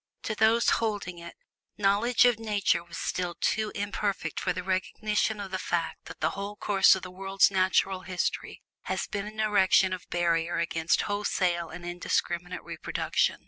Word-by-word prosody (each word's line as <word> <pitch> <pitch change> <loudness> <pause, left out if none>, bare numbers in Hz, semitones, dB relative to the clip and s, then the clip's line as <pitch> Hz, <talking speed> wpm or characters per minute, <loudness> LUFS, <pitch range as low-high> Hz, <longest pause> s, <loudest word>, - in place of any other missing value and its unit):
To 220 - -2
those 220 +2 +3
holding 205 -6 -2
it, 170 0 -10 0.4
knowledge 210 +5 +3
of 240 -3 +3
Nature 205 -6 +1
was 170 - -10
still 180 -1 -2
too 215 -1 0
imperfect 200 -4 -2
for - - 0
the 180 - -4
recognition 210 +3 -1
of 195 -2 -6
the 190 - -2
fact 170 -1 -2
that - - -11
the - - +2
whole 200 +1 -5
course 200 -2 +5
of 190 - -7
the 185 - -7
world's 195 +1 +2
natural 190 0 +2
history 185 -1 -3 0.2
has - - -2
been 205 -1 -4
an 215 +1 -9
erection 195 -3 +4
of 185 - -7
barrier 170 -1 +1
against 165 -1 +1
wholesale 180 -5 0
and 175 - -9
indiscriminate 175 0 -2
reproduction. - - -1
190 Hz, 165 wpm, -28 LUFS, 175-210 Hz, 0.4 s, course